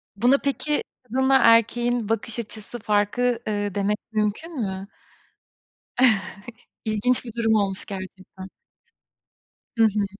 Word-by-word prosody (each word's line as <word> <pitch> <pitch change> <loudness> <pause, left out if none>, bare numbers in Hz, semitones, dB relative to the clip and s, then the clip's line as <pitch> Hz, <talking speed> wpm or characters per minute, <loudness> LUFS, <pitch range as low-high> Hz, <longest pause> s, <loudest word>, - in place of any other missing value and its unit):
Buna 245 +7 +4
peki 290 +2 -1 0.2
kadınla 265 +3 +2
erkeğin 230 0 +3
bakış 225 +1 -2
açısı 220 +1 -7
farkı 215 +3 +1
eee 205 -2 -2
demek 205 +1 0 0.2
mümkün 220 +9 -2
mü? 190 -1 -4 2.0
İlginç 220 +4 +1
bir 230 - -8
durum 225 -1 +2
olmuş 195 -2 0
gerçekten. 190 -1 -9 1.3
Hı 225 - +5
hı. 210 -1 +1
220 Hz, 105 wpm, -24 LUFS, 205-245 Hz, 2.0 s, Hı